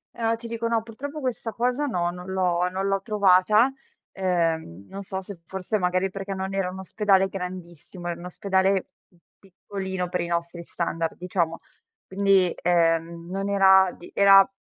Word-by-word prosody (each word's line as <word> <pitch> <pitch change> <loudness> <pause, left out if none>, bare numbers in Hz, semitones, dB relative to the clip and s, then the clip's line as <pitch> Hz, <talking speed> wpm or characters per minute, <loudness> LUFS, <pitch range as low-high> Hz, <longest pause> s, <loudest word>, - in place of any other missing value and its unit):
Ehm, 230 -1 0
ti 230 - -9
dico 230 0 -3
no, 230 -1 +1
purtroppo 280 +7 -7
questa 250 -4 -3
cosa 250 +6 0
no, 175 -10 0
non 180 +1 -9
l'ho 180 -1 +1
non 190 +2 -2
l'ho 195 0 0
trovata, 210 +3 +4 0.4
ehm, 165 - -1
non 200 +1 -7
so 190 0 -5
se 190 -1 -9
forse 190 +4 -2
magari 185 0 +1 0.3
non 190 0 -4
era 195 -2 0
un 185 +1 -8
ospedale 195 0 +2
grandissimo, 180 -2 -8
era 175 - -3
un 175 - -9
ospedale 190 +1 +1 0.2
p 175 - -28 0.2
piccolino 190 -1 -5
per 180 0 -1
i 170 - -3
nostri 170 0 -3
standard 165 -1 -3
diciamo 170 -2 -1 0.5
quindi, 195 -2 +3
ehm, 170 -1 +1
non 195 +2 -3
era 190 -2 +5
di 175 - -12
era 195 -1 +7
190 Hz, 165 wpm, -25 LUFS, 175-200 Hz, 0.5 s, era